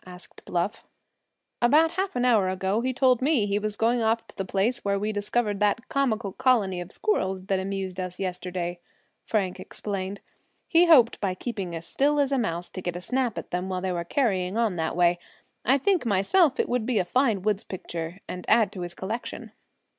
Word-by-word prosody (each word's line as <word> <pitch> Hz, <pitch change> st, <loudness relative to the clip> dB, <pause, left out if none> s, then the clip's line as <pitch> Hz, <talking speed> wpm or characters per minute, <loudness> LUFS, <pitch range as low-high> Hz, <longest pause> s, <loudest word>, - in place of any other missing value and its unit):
asked 180 Hz, -1 st, -13 dB
Bluff, 180 Hz, +4 st, -2 dB, 0.8 s
"About 300 Hz, +7 st, +5 dB
half 375 Hz, -1 st, -2 dB
an 245 Hz, 0 st, +1 dB
hour 215 Hz, -7 st, +4 dB
ago 190 Hz, +3 st, 0 dB
he 260 Hz, +1 st, 0 dB
told 255 Hz, -1 st, +3 dB
me 270 Hz, -6 st, +3 dB
he 205 Hz, 0 st, 0 dB
was 210 Hz, 0 st, -3 dB
going 235 Hz, +2 st, +2 dB
off 225 Hz, +1 st, +1 dB
to -, -, -16 dB
the 195 Hz, -, -2 dB
place 195 Hz, +6 st, 0 dB
where 200 Hz, 0 st, +1 dB
we 210 Hz, +2 st, -1 dB
discovered 205 Hz, 0 st, -1 dB
that 210 Hz, +3 st, +1 dB
comical 235 Hz, -7 st, 0 dB
colony 215 Hz, -8 st, +2 dB
of 175 Hz, -, -8 dB
squirrels 190 Hz, -, -1 dB
that 195 Hz, -1 st, 0 dB
amused 190 Hz, -1 st, -4 dB
us 180 Hz, -1 st, -4 dB
yesterday," 180 Hz, -1 st, -3 dB, 0.5 s
Frank 195 Hz, -5 st, -1 dB
explained. 200 Hz, -1 st, -4 dB, 0.5 s
"He 340 Hz, +1 st, +5 dB
hoped 255 Hz, -8 st, +6 dB
by 190 Hz, -3 st, 0 dB
keeping 190 Hz, -5 st, -4 dB
as 165 Hz, 0 st, -6 dB
still 290 Hz, -, +1 dB
as 280 Hz, -1 st, +2 dB
a 275 Hz, -, +2 dB
mouse 175 Hz, -5 st, -2 dB
to 185 Hz, -, -7 dB
get 175 Hz, -1 st, -3 dB
a -, -, -3 dB
snap 250 Hz, +2 st, -1 dB
at -, -, -6 dB
them 180 Hz, +1 st, -2 dB
when 185 Hz, 0 st, -3 dB
they 190 Hz, -, 0 dB
were 170 Hz, -1 st, -2 dB
carrying 190 Hz, -3 st, 0 dB
on 225 Hz, -5 st, +1 dB
that 160 Hz, -1 st, -1 dB
way. 175 Hz, 0 st, +3 dB, 0.4 s
I 265 Hz, +4 st, +4 dB
think 365 Hz, +6 st, +2 dB
myself 250 Hz, -, +3 dB
it -, -, +2 dB
would 245 Hz, -2 st, -1 dB
be 250 Hz, -3 st, +1 dB
a 185 Hz, -, +2 dB
fine 225 Hz, -2 st, +1 dB
woods 210 Hz, -1 st, 0 dB
picture, 170 Hz, -2 st, -6 dB
and 180 Hz, 0 st, -6 dB
add 220 Hz, -3 st, +4 dB
to 185 Hz, -, -7 dB
his 175 Hz, -1 st, -6 dB
collection." 220 Hz, +5 st, -5 dB
205 Hz, 205 wpm, -26 LUFS, 185-245 Hz, 0.8 s, hoped